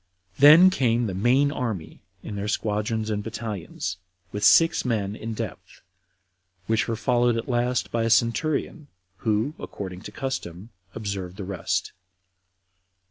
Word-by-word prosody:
Then 155 +7 +9
came 120 -6 +1
the 100 - -3
main 125 +9 +3
army 110 - -4 0.2
in 105 - -6
their 100 +1 -3
squadrons 110 +1 -1
and 105 -1 -1
battalions, 110 -6 -5 0.3
with 105 0 -4
six 165 +10 +5
men 105 -5 -1
in 110 0 -6
depth, - - -7 0.8
which 110 +1 +1
were 115 - -1
followed 120 0 +2
at 115 - -4
last 120 0 0
by 115 - 0
a 115 - +1
centurion, 140 +6 +1 0.3
who, 110 +7 0
according 95 -2 -7
to - - -9
custom, 110 -6 -5 0.2
observed 100 -4 -5
the 100 - -5
rest. 95 -2 -2
115 Hz, 135 wpm, -25 LUFS, 105-125 Hz, 0.8 s, Then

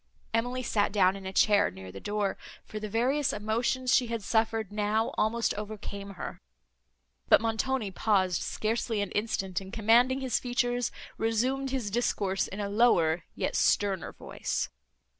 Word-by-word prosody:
Emily 245 +3 0
sat 205 -4 +1
down 190 -2 +4
in 195 -1 -7
a - - -4
chair, 205 +1 +4
near 95 0 -10
the 95 - -8
door, 205 - -1 0.3
for 215 - -6
the 215 0 -5
various 260 +6 +1
emotions 240 +4 0
she 250 - +4
had 230 -2 -3
suffered, 220 -1 0
now 210 +2 0
almost 230 +2 +1
overcame 200 -1 -7
her; - - -7 0.9
but - - +8
Montoni 225 0 -1
paused 185 -3 +1
scarcely 225 0 -1
an 205 - -3
instant, 195 -3 -1
and, 190 0 -10
commanding 235 +5 +4
his 260 -3 0
features, 245 -1 0 0.3
resumed 255 +5 0
his 255 -6 -2
discourse 200 -4 0
in 195 - -7
a 205 - -1
lower, 180 -7 +3
yet - - -2
sterner 195 -4 +2
voice. - - -3
215 Hz, 155 wpm, -29 LUFS, 200-240 Hz, 0.9 s, but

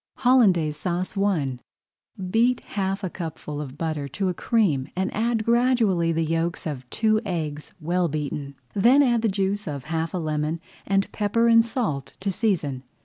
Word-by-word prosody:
HOLLANDAISE 195 - +3
SAUCE 180 +1 -2
I 170 -10 0 0.7
Beat 235 +3 +3
half 195 0 -2
a 185 - -1
cupful 155 -3 -5
of 140 -1 -8
butter 155 -3 -2
to 185 +8 -2
a - - -1
cream 175 - +1
and 190 +1 -1
add 225 0 0
gradually 230 -8 +3
the 165 0 0
yolks 165 +1 -1
of 130 -5 -5
two 215 - +2
eggs 155 -6 -4
well 175 +2 +1
beaten. 150 -2 -4 0.2
Then 245 +8 +5
add 240 -4 +2
the 225 - +2
juice 195 +1 -1
of 140 -3 -5
half 165 +3 -2
a - - 0
lemon 155 0 -1 0.3
and 195 0 +1
pepper 225 +3 +1
and 230 0 +7
salt 220 - -3
to 195 +1 0
season. 170 - 0
180 Hz, 165 wpm, -24 LUFS, 155-215 Hz, 0.7 s, and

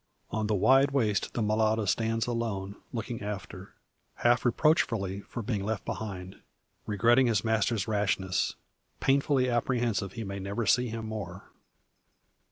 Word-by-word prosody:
On 110 -1 -1
the 105 - +1
wide 135 +7 +5
waste 115 -7 0
the 115 - 0
mulatto 110 +1 +2
stands 115 +3 +1
alone, 110 -5 -3 0.2
looking 115 0 -4
after 100 -2 -7 0.4
half 120 0 +3
reproachfully 115 - +2
for 120 +3 -7
being 105 -3 -2
left 110 0 -3
behind 95 -3 -6 0.5
regretting 120 +5 +4
his 110 -4 +1
master's 110 -2 +1
rashness 95 -3 0 0.4
painfully 135 -1 +2
apprehensive 120 -5 0
he 115 - -5
may 100 -1 -5
never 100 +4 -3
see 125 +3 +3
him 115 -1 -5
more. 100 -4 -7
110 Hz, 135 wpm, -29 LUFS, 100-120 Hz, 0.5 s, wide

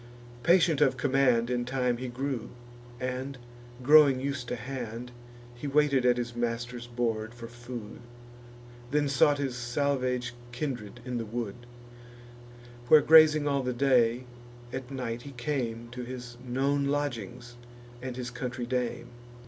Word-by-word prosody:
Patient 170 -2 +4
of - - +4
command 125 -3 +2
In 120 -1 0
time 125 -1 0
he 130 +1 -5
grew, 125 -1 -3 0.5
and, 130 +2 -4 0.5
growing 145 -1 +7
us'd 135 -2 -3
to 125 - -2
hand, 120 0 -6 0.4
He 120 +4 -6
waited 140 -3 +3
at 125 0 +4
his 120 -1 -3
master's 120 0 -3
board 115 -2 -2
for 115 -1 -8
food; 120 -2 -8 0.9
Then 145 +1 +1
sought 145 +1 +4
his 135 -3 -2
salvage 125 0 -1 0.2
kindred 120 -4 -5
in 125 -2 -3
the 115 - -4
wood, 120 +1 -5 1.2
Where 155 +3 +8
grazing 155 -1 +7
all 140 -1 +1
the 125 -1 -2
day, 125 -2 +3 0.5
at 130 -1 -5
night 125 -3 -4
he 140 +2 -10
came 120 -3 -3
To 125 0 -6
his 120 -1 -7
known 135 +3 0
lodgings, 125 -4 -3 0.5
and 130 -1 -5
his 125 -1 -4
country 125 0 -4
dame. 120 -1 -2
125 Hz, 140 wpm, -29 LUFS, 120-135 Hz, 1.2 s, Where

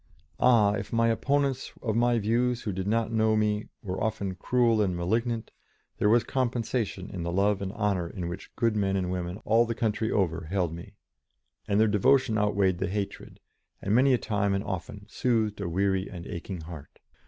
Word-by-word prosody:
Ah! 115 -5 +5
if - - -4
opponents 130 +4 +1
of 110 -4 -1
my 120 +1 +3
views 120 +3 +1
who 105 - -2
did 95 +1 -3
not 115 +1 +1
know 110 -1 +2
me 105 0 0 0.2
were 95 -1 -3
often 100 -3 -2
cruel 115 +3 +2
and 95 -4 +1
malignant, 115 +6 -1 0.5
there 105 - +3
was 115 +1 +4
compensation 120 -6 -2
in 95 -4 -5
the 85 0 -2
love 100 +2 +2
and 95 -1 -3
honour 100 -6 -1
in 90 -3 -5
which 90 +3 -7
good 115 -2 +1
men 100 -2 +1
and 90 -2 -1
women 90 0 -3
all 115 +2 +4
the 115 - -2
country 110 -1 0
over 85 -7 0
held 90 -4 0
me, 85 +1 -10 0.7
and 100 0 +2
their 110 - +5
devotion 115 +3 +3
outweighed 100 -3 +1
the 95 - 0
hatred, 100 0 -5 0.4
and 100 - -1
many 130 +4 +5
a 125 - +4
time 100 -3 0
and 100 - -1
often 100 +1 -6
soothed 110 -3 0
a 95 - -2
weary 95 +2 0
and 85 -3 -8
aching 90 +1 -6
heart. 80 -3 -10
105 Hz, 190 wpm, -28 LUFS, 95-115 Hz, 0.7 s, Ah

